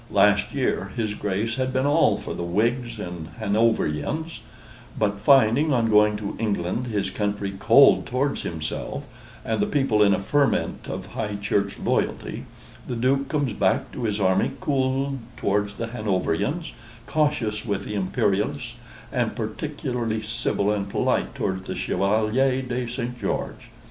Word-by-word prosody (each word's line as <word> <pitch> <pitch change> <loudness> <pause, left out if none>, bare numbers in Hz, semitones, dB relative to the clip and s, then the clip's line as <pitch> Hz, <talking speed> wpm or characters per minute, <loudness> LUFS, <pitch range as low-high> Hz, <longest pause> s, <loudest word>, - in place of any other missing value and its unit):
Last - - +4
year - - 0
his 110 -3 -1
Grace 105 +4 -2
had 130 0 0
been 130 +1 +1
all 145 +3 +4
for - - -6
the - - -5
Whigs 115 +7 0
and 85 -5 -6
Hanoverians; 110 - 0 0.6
but 105 -1 0
finding, 135 +5 +5
on 115 -4 +2
going 105 0 +5
to 105 -1 -5
England, 105 +2 -1
his 100 -4 -1
country 100 -1 -2
cold 135 +6 +6
towards 135 +3 0
himself, 80 -2 -4 0.4
and 110 -1 -1
the 105 - +2
people 135 -7 +2
in 100 -1 +5
a - - -2
ferment 140 +8 0
of - - -4
High 105 -2 -3
Church 100 0 -1
loyalty, - - -1 0.4
the 125 - -3
Duke 135 +4 +1
comes 145 -6 0
back - - +1
to 120 - -4
his 105 -1 -1
army 95 +4 +2
cooled 135 0 0 0.2
towards 105 +1 0
the 115 - -2
Hanoverians, 115 - -1 0.3
cautious 120 -9 0
with 100 -3 -2
the - - -5
Imperialists, 95 -4 0 0.4
and - - 0
particularly 115 -3 -3
civil 110 -2 0
and 100 -1 -2
polite - - 0
towards 95 -1 -2
the - - -3
Chevalier 110 +6 +1
de 125 -1 -3
St. 125 0 -4
George. 100 - -3
110 Hz, 150 wpm, -24 LUFS, 100-130 Hz, 0.6 s, cold